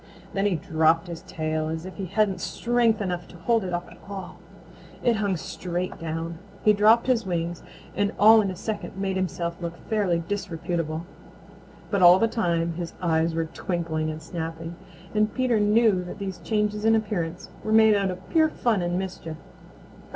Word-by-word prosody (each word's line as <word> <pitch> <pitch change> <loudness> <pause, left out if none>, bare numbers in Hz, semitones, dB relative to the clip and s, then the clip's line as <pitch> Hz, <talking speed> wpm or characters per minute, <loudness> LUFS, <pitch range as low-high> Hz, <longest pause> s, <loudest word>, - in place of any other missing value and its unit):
Then 195 +1 +1
he 195 - +1
dropped 160 +1 +2
his 170 -1 -6
tail 155 -1 -2
as 160 +2 -4
if 185 - -9
he 195 -2 -4
hadn't 195 -1 +1
strength 235 -1 +1
enough 175 -2 -3
to 175 - -13
hold 225 +5 +1
it 185 - -4
up 175 0 -3
at - - -15
all. 190 -3 -7 0.6
It 235 -2 +3
hung 200 -4 0
straight 180 +2 -4
down. 165 0 -4 0.3
He 210 - +7
dropped 215 +3 +5
his 250 -3 +2
wings 175 -2 -2 0.3
and 200 +1 +1
all 220 +2 +8
in 200 - -1
a 185 - -4
second 210 0 -5
made 195 -1 -1
himself 175 -2 -2
look 170 0 -4
fairly 185 -6 0
disreputable. 170 -4 -3 0.9
But 200 -2 +1
all 175 +1 +9
the 225 - +3
time 170 -7 0
his 170 0 -6
eyes 165 -1 +1
were 165 0 0
twinkling 160 -1 -2
and 155 0 -6
snapping, 165 0 -5 0.4
and 215 0 +2
Peter 250 -4 +1
knew 210 -2 +4
that 180 - -7
these 195 -2 -5
changes 210 -1 -1
in 225 0 +5
appearance 180 -6 -2
were 215 - -2
made 220 0 +7
out 200 -2 +1
of 185 0 -7
pure 315 -2 +4
fun 230 -9 0
and 175 0 -1
mischief. 180 -4 -5
185 Hz, 180 wpm, -25 LUFS, 170-210 Hz, 0.9 s, all